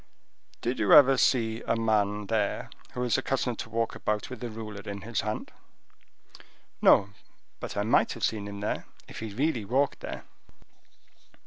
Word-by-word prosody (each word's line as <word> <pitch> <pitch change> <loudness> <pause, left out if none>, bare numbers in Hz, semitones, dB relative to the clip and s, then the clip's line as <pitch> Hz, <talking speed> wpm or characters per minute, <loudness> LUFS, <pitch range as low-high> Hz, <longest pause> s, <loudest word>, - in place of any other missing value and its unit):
"Did 120 +2 -2
you - - +4
ever 135 -2 +9
see 115 -3 +2
a - - +2
man 105 -2 +1
there 105 -1 -1 0.2
who 125 - -2
is 125 0 +2
accustomed 130 -3 -1
to - - -5
walk 115 0 -1
about 105 +3 -2
with 130 - -7
a 120 - -3
ruler 110 -2 -7
in 100 -1 -6
his 115 +2 -2
hand?" 105 +1 -4 1.3
"No; 100 0 +5 0.5
but - - -6
I 100 - +1
might 110 - +3
have - - -8
seen 105 -2 0
him 100 0 -7
there, 105 - -3 0.2
if - - -9
he 110 -2 -5
really 130 +1 0
walked 135 +7 +1
there." - - -6
110 Hz, 170 wpm, -28 LUFS, 105-125 Hz, 1.3 s, ever